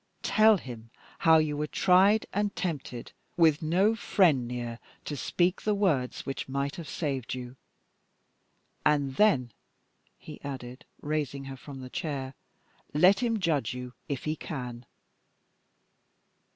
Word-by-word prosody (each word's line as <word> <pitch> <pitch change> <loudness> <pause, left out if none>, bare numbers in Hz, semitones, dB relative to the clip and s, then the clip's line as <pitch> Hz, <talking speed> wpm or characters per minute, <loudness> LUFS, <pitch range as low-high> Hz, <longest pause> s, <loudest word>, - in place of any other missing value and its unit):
Tell 215 -1 +5
him 115 -7 -9 0.3
how 160 -1 +6
you 155 -2 +1
were 150 +1 -2
tried 195 +7 +4
and 205 0 0
tempted, 140 -9 -4 0.3
with 160 -2 +4
no 185 +7 +3
friend 170 - +2
near 120 -1 -5 0.3
to 150 - -4
speak 175 +6 0
the 210 -1 +1
words 155 -11 0
which 135 -1 -4
might 140 +1 -2
have 165 -4 -7
saved 135 -6 -3
you. 125 0 -7 1.3
And 145 -3 +1
then," 135 - +3 0.7
he - - -11
added, 130 -2 -7 0.2
raising 145 -2 -2
her 135 0 -7
from 135 0 -10
the 130 - -8
chair, 135 -4 -4 0.6
"let 185 +6 +6
him 230 -3 +1
judge 145 - 0
you 125 -1 -7 0.2
if 140 -3 -3
he 155 0 -1
can!" 125 -6 -6
145 Hz, 135 wpm, -28 LUFS, 130-180 Hz, 1.3 s, how